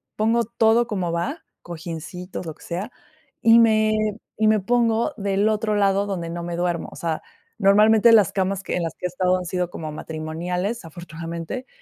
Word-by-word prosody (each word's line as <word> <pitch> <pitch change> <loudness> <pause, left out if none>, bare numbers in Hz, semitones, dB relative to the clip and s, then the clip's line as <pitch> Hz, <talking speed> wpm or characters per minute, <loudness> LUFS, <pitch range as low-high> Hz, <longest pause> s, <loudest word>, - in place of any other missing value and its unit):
pongo 225 +2 +2
todo 230 +1 +3
como 185 -6 -2
va, 255 - -3 0.2
cojíncitos, 175 +2 -7
lo 160 - -5
que - - -18
sea, 185 +7 -4 0.5
y 230 +1 +7
me 215 -1 +4 0.4
y 215 0 +3
me 215 -1 +4
pongo 235 +4 +1
del 200 +1 +1
otro 215 0 0
lado 200 0 +2
donde 170 -4 -3
no 170 0 -4
me 170 0 -4
duermo. 175 -1 -1
O - - -12
sea, 165 -2 -3 0.4
normalmente, 215 +3 +6
las 210 -6 +6
camas 195 0 -1
que - - -3
en 180 - -1
las 165 - -3
que - - -7
he - - +3
estado 180 +1 +1
han 180 - -5
sido 180 0 -2
como 155 -3 -6
matrimoniales, 170 +8 -4
afortunadamente. 165 - -7
190 Hz, 185 wpm, -23 LUFS, 170-220 Hz, 0.5 s, y